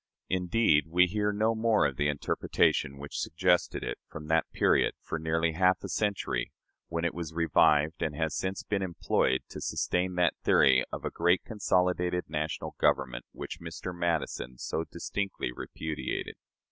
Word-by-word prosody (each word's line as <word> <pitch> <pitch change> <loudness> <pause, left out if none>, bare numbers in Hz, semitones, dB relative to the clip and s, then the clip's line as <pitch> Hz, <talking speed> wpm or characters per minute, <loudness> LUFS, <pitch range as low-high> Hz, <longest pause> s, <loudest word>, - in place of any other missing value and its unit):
Indeed, 90 -3 +3
we 90 +3 +5
hear 105 +3 0
no 110 +2 +1
more 110 -1 +3
of 70 - 0
the 75 +2 +1
interpretation 70 -1 +1
which 70 +1 -6
suggested 90 +2 +1
it, - - -4
from 75 - -9
that 80 0 +2
period, - - +2
for 80 - -4
nearly 80 +1 +1
half 90 +2 +2
a - - -5
century, 105 -2 -1 0.4
when 85 0 -2
it 85 - 0
was 80 -2 -6
revived, 80 -2 +3
and 75 -2 -1
has 80 0 -1
since 95 +1 -2
been 100 -1 -1
employed, 85 -7 +1
to - - -8
sustain 90 0 -1
that 90 -1 +3
theory 65 -1 +5
of - - -5
a - - -2
"great 90 +2 +2
consolidated 90 -4 +1
national 75 0 -3
government" 60 -2 +1
which - - -7
Mr. 85 +2 -6
Madison 80 -7 -2
so 80 - -3
distinctly 95 -4 -3
repudiated. 80 -1 -4
85 Hz, 160 wpm, -29 LUFS, 75-90 Hz, 0.4 s, we